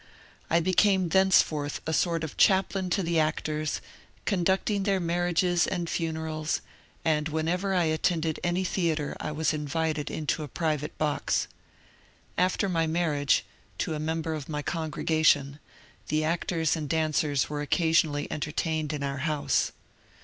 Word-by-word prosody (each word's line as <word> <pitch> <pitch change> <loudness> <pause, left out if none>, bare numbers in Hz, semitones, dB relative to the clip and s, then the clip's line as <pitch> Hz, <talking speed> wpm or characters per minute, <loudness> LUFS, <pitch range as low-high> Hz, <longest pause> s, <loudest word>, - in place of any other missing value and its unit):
I 165 - +4
became 185 +1 +3
thenceforth 160 -6 +3
a 160 - -1
sort 165 +1 +1
of 160 - -5
chaplain 190 -1 +3
to 190 +2 +1
the 165 -1 +1
actors, 155 0 -1 0.4
conducting 195 +1 +1
their 195 -1 +1
marriages 175 0 +1
and 175 -2 -2
funerals, 160 -2 -2 0.4
and 155 -1 +1
whenever 175 +5 0
I 180 - +3
attended 160 0 0
any 175 +2 +1
theatre 165 -5 -1
I - - -3
was 155 +1 0
invited 155 0 -1
into 155 0 -2
a 150 - -4
private 150 0 -2
box. 150 -2 0 0.9
After 185 +2 +1
my 165 -3 +1
marriage, 155 -4 +1 0.3
to 160 - -1
a 150 - -3
member 160 +1 -2
of 150 -2 -6
my 150 -1 -3
congregation, 155 -3 +1 0.5
the 155 +1 +1
actors 165 0 0
and 155 -3 -4
dancers 155 -3 +1
were 145 0 -3
occasionally 155 -1 +2
entertained 155 0 -2
in 145 -1 -3
our 140 0 -2
house. 150 0 0
160 Hz, 140 wpm, -28 LUFS, 150-175 Hz, 0.9 s, I